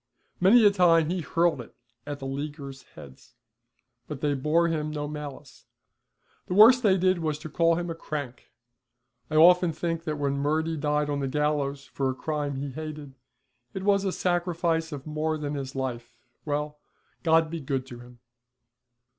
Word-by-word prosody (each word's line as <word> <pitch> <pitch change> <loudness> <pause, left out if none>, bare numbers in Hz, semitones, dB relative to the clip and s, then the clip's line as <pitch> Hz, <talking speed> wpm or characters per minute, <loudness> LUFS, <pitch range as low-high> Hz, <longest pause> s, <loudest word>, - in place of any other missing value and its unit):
Many 215 +5 +6
a 205 - +7
time 170 -4 +4
he 180 -1 -1
hurled 165 0 +1
it 120 - -14 0.3
at 145 -1 -4
the 135 - -8
Leaguers' 140 0 -6
heads, 65 -2 -14 0.7
but 150 -3 -6
they 145 0 0
bore 155 +5 +2
him 155 -2 -2
no 150 -1 -4
malice; 145 -4 -9 0.8
the 180 - -2
worst 235 +5 +8
they 195 -5 +4
did 185 0 +2
was 155 -2 -2
to 155 +1 -9
call 165 +2 +2
him 175 +1 -3
a 165 - -3
crank. 145 -6 -6 0.8
I 155 - -3
often 175 +2 +6
think 165 +1 -3
that 155 -1 -2
when 140 -1 -1
Murty 160 +3 0
died 150 0 0
on 145 - -1
the 135 - -1
gallows 145 0 -1
for 135 0 -2
a 130 - -3
crime 145 0 -3
he 140 +1 -4
hated, 150 -1 -7 0.6
it 190 - -4
was 200 -1 +3
a 195 - 0
sacrifice 170 -2 -1
of 145 -2 -7
more 155 +1 -2
than 150 -1 -4
his 135 -2 -5
life. 125 -3 -5 0.3
Well, 150 0 -3 0.4
God 160 -1 +3
be 165 - -4
good 135 -2 -3
to 120 -2 -10
him! 120 0 -15
150 Hz, 175 wpm, -26 LUFS, 140-165 Hz, 0.8 s, worst